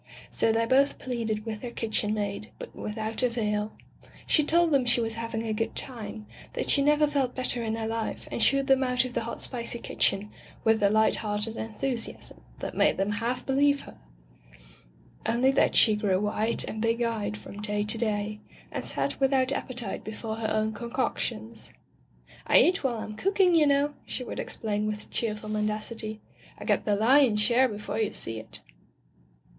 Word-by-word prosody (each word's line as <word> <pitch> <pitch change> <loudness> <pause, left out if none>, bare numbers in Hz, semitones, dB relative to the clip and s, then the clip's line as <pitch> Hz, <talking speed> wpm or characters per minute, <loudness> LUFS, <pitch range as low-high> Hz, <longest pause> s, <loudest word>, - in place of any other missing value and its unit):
So 225 - +3
they 225 +1 +2
both 270 +4 +3
pleaded 230 -4 -3
with 220 -2 -5
their 245 - -5
kitchen 215 -2 0
maid, 205 +1 -3
but - - -9
without 220 +2 -3
avail. 215 -4 0 0.5
She 305 - +4
told 335 +2 +3
them 275 -3 +4
she 240 0 +3
was 225 -1 0
having 230 0 -4
a 220 - -1
good 225 +1 -2
time, 220 -4 -5 0.3
that - - +1
she 280 - +5
never 295 +1 +4
felt 280 -4 0
better 255 -2 0
in 220 0 -1
her 225 -1 -3
life 225 0 -3
and - - -2
shooed 275 +2 +4
them 270 -1 +4
out 250 0 +2
of 250 - -6
the 225 - -2
hot 235 - -4
spicy 235 -1 -3
kitchen 210 -3 0 0.3
with 220 -1 +3
a 200 - +5
light 220 +1 +3
hearted 210 +1 -2
en 220 -1 -6
thusiasm 250 -3 -3 0.2
that - - -6
made - - +3
them 195 +2 0
half 235 +4 -2
believe 280 +1 +3
her, - - -13 0.7
— - - -27
only 255 +3 +3
that 270 - +2
she 215 -3 +6
grew 200 -3 +1
white 210 +2 +1
and 220 - -5
big 230 +1 +1
eyed 210 -3 -2
from 205 0 -10
day 210 -1 -1
to 215 +2 -1
day, 210 -2 -1 0.3
and - - -4
sat - - 0
without 265 -1 +3
appetite 245 -7 -4
before 220 0 -5
her 220 -1 -2
own 215 0 0
concoctions. 230 -1 -3 0.8
"I - - +6
eat 365 -1 +4
while 230 -4 -1
Fm 215 0 -9
cook 390 +2 -1
ing, 365 -2 +6
you 315 -3 +5
know," 285 +1 +2
she 255 - -4
would - - -6
explain 210 -1 -2
with 210 0 -5
cheerful 215 -2 -3
mendacity. 215 +1 -3 0.4
"I - - -9
get - - +1
the 210 - +2
lion's 230 0 +4
share 245 +4 +4
before 210 +1 -4
you 220 - +1
see 115 -1 -3
it." 110 - -10
225 Hz, 190 wpm, -27 LUFS, 215-255 Hz, 0.8 s, she